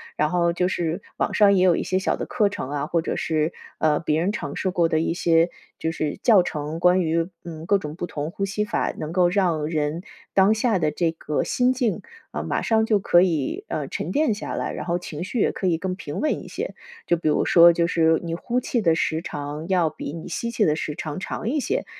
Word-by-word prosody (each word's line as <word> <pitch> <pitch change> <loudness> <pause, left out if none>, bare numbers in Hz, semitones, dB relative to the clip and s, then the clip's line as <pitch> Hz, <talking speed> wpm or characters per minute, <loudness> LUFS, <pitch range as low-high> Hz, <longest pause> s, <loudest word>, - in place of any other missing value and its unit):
然 150 - +1
后 170 0 +1
就 180 +1 +1
是 170 0 -2 0.2
网 - - -1
上 205 -1 +5
也 185 -2 +3
有 180 -2 +5
一 - - -2
些 185 - 0
小 190 - 0
的 - - -4
课 210 -3 +2
程 130 - -5
啊， 145 0 -2
或 170 0 +1
者 - - -3
是， 155 0 0 0.3
呃， 155 -1 +2
别 160 -1 0
人 185 +4 +1
尝 145 -8 -5
试 190 - -1
过 175 -2 +2
的 160 - +2
一 165 - 0
些， 165 -1 +3 0.3
就 160 - -1
是 155 -2 -3
教 210 -6 +6
程， 150 0 -4
关 180 +1 +4
于， 165 0 0 0.2
嗯， 160 -2 -7
各 200 +3 +3
种 150 -3 -6
不 175 - -4
同 150 -2 -4
呼 195 - -2
吸 210 +2 -1
法 210 - -1
能 155 - -4
够 180 0 +3
让 175 -5 +1
人 155 +1 -2 0.3
当 195 +2 +5
下 220 -1 +1
的 155 -2 +1
这 170 0 0
个 150 -2 -2
心 250 +1 +2
境， 245 -4 -1 0.3
呃， - - -4
马 - - -1
上 220 -1 +2
就 215 -2 +2
可 175 -2 +4
以， 180 - -1
呃， - - -3
沉 - - -4
淀 295 -5 +2
下 210 - -5
来， - - -2
然 - - -5
后 175 0 0
情 165 -2 -6
绪 190 +6 -3
也 - - +3
可 - - -5
以 170 -2 +2
更 185 +1 -2
平 150 -6 -6
稳 305 - -1
一 - - -11
些。 - - -5 0.3
就 170 - +3
比 165 - -3
如 150 - +2
说 170 0 +7
就 170 0 +1
是， 160 -2 +3
你 165 -1 -3
呼 240 +8 -1
气 240 -1 -1
的 165 -3 +4
时 160 0 0
长， 150 +1 -5
要 180 -4 +3
比 145 - -7
你 165 +1 -7
吸 235 +7 -3
气 230 - +1
的 150 - +2
时 155 -1 -3
长 155 -1 -5
长 210 +3 -4
一 295 +4 0
些。 - - -1
170 Hz, 265 characters per minute, -23 LUFS, 160-195 Hz, 0.3 s, 说